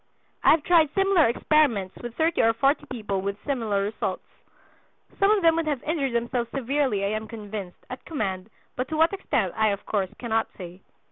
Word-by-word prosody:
I - - +6
have 310 -2 +5
tried 330 -4 +4
similar 390 -6 +4
experiments 235 -6 +1
with 240 -1 -7
thirty 325 +1 +2
or 225 0 +4
forty 280 +5 +1
people 210 -6 -3
with 200 +1 -3
similar 225 -8 0
results. 210 +2 -3 1.0
Some 395 - +4
of 420 -3 +3
them 330 -1 +5
would 330 -1 -1
have 290 -4 -1
injured 290 -5 -1
themselves 235 0 -1
severely, 265 -6 0
I - - 0
am 215 +1 -3
convinced, 210 -4 -8
at 255 - -8
command, 195 - -3 0.3
but 255 +1 -2
to 310 - -3
what 325 +4 +4
extent 220 - -1
I 220 0 +2
of 200 -1 -2
course 195 -3 -1
cannot 225 -2 0
say. 180 0 -9
235 Hz, 190 wpm, -25 LUFS, 205-305 Hz, 1.0 s, I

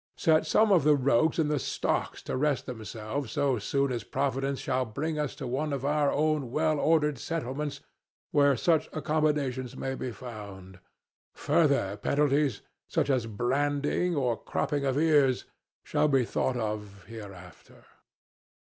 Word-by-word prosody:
Set 160 -1 +3
some 215 -1 +4
of 175 -7 +5
the 150 0 +5
rogues 140 +3 +2
in 160 -3 +2
the 150 -1 0
stocks - - -2
to - - -3
rest 140 0 0
themselves 115 +2 -5
so 140 -4 +1
soon 140 +5 0
as 120 - -3
Providence 135 0 -1
shall 130 -1 0
bring 150 +7 -3
us 150 -2 -2
to 140 -1 -6
one 135 +5 -2
of 140 -1 -3
our 145 0 +2
own 150 -3 0
well 155 +3 +1
ordered 150 -4 +2
settlements 150 -2 -4 0.5
where 140 -2 +4
such 165 -3 +2
accommodations 145 -5 -1
may 135 - -3
be 130 -1 -4
found. 100 -5 -10 0.6
Further 140 - +2
penalties, 140 0 +1 0.2
such - - 0
as 125 -4 0
branding 145 - 0
and 125 -5 0
cropping 145 -1 -1
of 135 0 0
ears, 145 -5 +3 0.4
shall - - +1
be 135 -4 +3
thought 125 +2 -1
of 105 -3 -4
hereafter." 100 -6 -12
140 Hz, 150 wpm, -28 LUFS, 120-150 Hz, 0.6 s, of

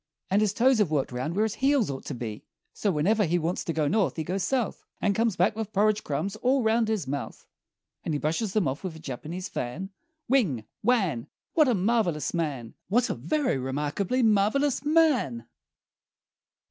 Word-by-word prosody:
And 200 +2 +4
his 210 -2 +2
toes 245 +3 +3
have 205 -6 +3
worked 145 -4 0
round 130 +7 -3
where 215 +2 +3
his 220 - -2
heels 270 - +3
ought 135 - -7
to 140 - -4
be. 110 -3 -6 0.3
So 210 - -1
whenever 195 +8 +2
he 175 +2 +1
wants 170 +1 -1
to - - -1
go 155 -2 0
North 195 +3 +1
he 160 - -2
goes 185 +5 -2
South, 245 +4 -1 0.2
And 205 - +2
comes 225 -1 +1
back 190 +5 +2
with 220 -1 -4
porridge 210 +1 +2
crumbs 160 +8 -2
all 255 +3 +2
round 225 +1 +2
his 215 -10 -1
mouth, 140 +1 -5 0.6
And 160 - -1
he - - +1
brushes 165 +8 -1
them 210 -8 +2
off 135 +6 -3
with 180 -4 -4
a - - -10
Japanese 160 +6 -6
fan, 165 +11 -5 0.3
Whing! 185 - +1 0.2
Whann! 195 - +1 0.3
What 310 -4 +5
a 245 - +3
marvelous 190 -6 +1
man! 145 -9 -3
What 240 +7 +2
a - - 0
very 290 - 0
remarkably 150 - -1
marvelous 225 +7 +2
man! 290 - +2
195 Hz, 190 wpm, -27 LUFS, 150-225 Hz, 0.6 s, What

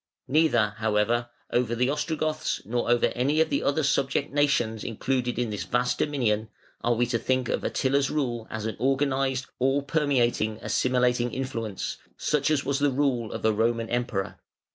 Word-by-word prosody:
Neither, 125 -8 +3
however, 110 +2 +1 0.2
over 120 -1 +1
the 125 +3 +1
Ostrogoths 155 +1 -2
nor 120 +2 -1
over 120 0 +4
any 140 +6 +1
of 160 - +2
the 280 - +1
other 145 +2 +1
subject 140 0 0
nations 120 -7 +1
included 125 +2 -1
in 120 -3 -1
this 100 -5 -3
vast 125 +8 0
dominion 115 -7 0 0.3
are 120 0 +2
we 120 +2 +2
to 120 -1 -1
think 130 0 0
of - - -1
Attila's 135 +1 +1
rule 120 -6 -2
as 110 -1 -4
an 110 - -3
organised, 135 -1 +1
all 135 +2 +2
permeating, 130 -8 +1
assimilating 125 -1 +1
influence, 115 -6 -4 0.2
such 150 -1 +1
as 145 -3 +1
was 135 0 0
the 145 0 +3
rule 130 -5 0
of - - -5
a 110 - +4
Roman 115 +1 0
Emperor. 120 -5 -2
125 Hz, 165 wpm, -26 LUFS, 115-140 Hz, 0.3 s, over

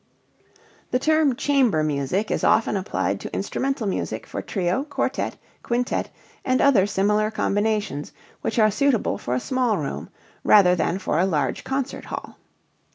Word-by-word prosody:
The 250 - +2
term 310 -1 +2
chamber 260 - +2
music 150 +8 -1
is - - -1
often 220 -1 +3
applied 195 0 -1
to - - -7
instrumental 270 -4 -2
music 195 - -3
for - - -5
trio, 185 +5 -1
quartet, 295 - -2 0.2
quintet, 245 +1 -1 0.3
and 255 0 +1
other 225 -9 +4
similar 210 +2 +1
combinations 210 -7 -1 0.3
which - - -2
are 215 -1 +5
suitable 270 +1 +1
for 125 - -2
a - - +1
small 250 - 0
room 105 - -4 0.3
rather 180 -4 +6
than 175 +1 0
for 185 -4 -1
a 185 - +3
large 145 -8 -1
concert 270 0 -3
hall. - - -7
210 Hz, 150 wpm, -23 LUFS, 180-255 Hz, 0.3 s, rather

